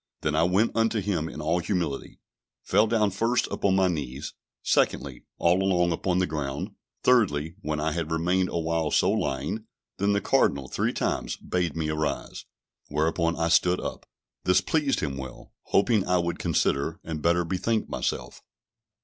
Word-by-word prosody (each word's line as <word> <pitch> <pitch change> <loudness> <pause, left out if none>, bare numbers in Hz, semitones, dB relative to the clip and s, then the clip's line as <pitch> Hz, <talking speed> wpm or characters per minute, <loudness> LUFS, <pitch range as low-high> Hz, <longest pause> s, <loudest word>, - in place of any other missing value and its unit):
Then 75 - 0
I 80 - +3
went 95 +7 +2
unto 115 -1 +2
him 90 -6 -1
in 75 - -7
all 80 +3 +1
humility, 85 -5 -2 0.5
fell 110 - +3
down 105 -2 +2
first 115 +6 +1
upon 95 -1 +1
my 95 -1 +4
knees; 75 -5 -4 0.3
secondly, - - 0
all 90 +2 +3
along 90 -2 +2
upon 90 +2 0
the 90 - +3
ground; 70 -4 -4 0.3
thirdly, 80 -11 +3
when 75 -4 -2
I 80 +1 0
had 80 0 -3
remained 90 +3 +1
awhile 80 -1 -1
so - - +3
lying, 70 +12 -2 0.3
then 100 +1 +2
the 100 - +2
Cardinal 70 -8 +2
three - - 0
times - - -2
bade 90 -4 -2
me 80 -1 -1
arise; 75 -1 -3 0.4
whereupon 80 +3 0
I 85 0 0
stood 90 +2 +4
up. - - -6 0.4
This 90 - +4
pleased 150 -4 0
him 70 -3 -2
well, 65 -1 -9
hoping 105 0 +3
I 90 0 +3
would 85 -1 -1
consider, 80 +5 0
and 80 -2 -5
better 85 +2 +2
bethink 100 +6 -1
myself. - - -3
85 Hz, 165 wpm, -26 LUFS, 75-95 Hz, 0.5 s, my